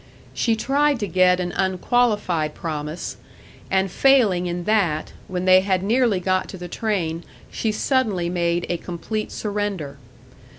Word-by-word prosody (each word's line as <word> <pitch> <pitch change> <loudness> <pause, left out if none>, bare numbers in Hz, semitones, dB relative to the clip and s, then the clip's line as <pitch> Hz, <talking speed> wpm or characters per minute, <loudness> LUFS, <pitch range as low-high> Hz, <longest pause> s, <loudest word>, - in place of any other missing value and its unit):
She 230 -2 +1
tried 280 +4 +1
to 205 - -1
get 180 +1 +3
an 175 -1 -2
unqualified 190 -4 0
promise; 155 0 -5 0.5
and 190 -1 +1
failing 215 -11 +3
in 175 0 -3
that, 180 -7 0
when 180 0 -3
they 185 0 +7
had 190 -1 0
nearly 230 -1 +2
got 185 +1 0
to 190 - -7
the 175 0 -7
train 175 -5 -2 0.3
she 220 - -1
suddenly 210 -6 0
made 175 0 0
a 175 - -1
complete 190 +6 -5
surrender. 200 -9 -3
185 Hz, 140 wpm, -22 LUFS, 175-215 Hz, 0.5 s, they